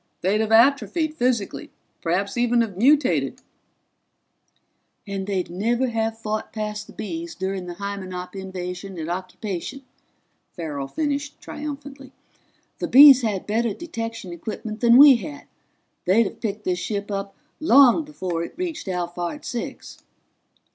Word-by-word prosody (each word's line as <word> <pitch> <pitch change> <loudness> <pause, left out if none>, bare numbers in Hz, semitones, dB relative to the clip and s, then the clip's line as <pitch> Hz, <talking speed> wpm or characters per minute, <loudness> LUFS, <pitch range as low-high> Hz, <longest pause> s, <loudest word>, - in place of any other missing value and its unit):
They'd 200 +4 +2
have 220 0 -1
atrophied 285 +7 +3
physically, 245 -7 -1 0.3
perhaps 195 +4 -1
even 240 0 +3
have 215 -5 -2
mutated 270 +6 +3 0.8
" - - -46
"And 195 -1 -4
they'd 190 -4 -2
never 235 +8 0
have 225 -1 -1
fought 215 -1 -4
past 210 -1 -4
the - - -13
Bees 330 +9 -6
during 190 -1 -3
the 175 - -6
Hymenop 185 -2 -6
invasion 190 0 -6
and 160 +1 -4
occupation," 185 +7 -5 0.7
Farrell 150 -5 -4
finished 290 - -3
triumphantly. 285 -2 -8 0.7
"The - - -2
Bees 275 0 +9
had 210 -5 -2
better 220 0 0
detection 230 - -6
equipment 215 +4 -6
than 235 +1 +6
we 280 -2 +9
had. 290 +4 -8 0.6
They'd 205 +6 +4
have - - -7
picked 210 -1 -3
this 180 -1 -1
ship 205 -1 -3
up 195 0 -4 0.2
long 280 0 +6
before 185 - -4
it - - -8
reached 340 - -4
Alphard 175 +6 -3
Six." 240 - -6
215 Hz, 135 wpm, -23 LUFS, 190-265 Hz, 0.8 s, Bees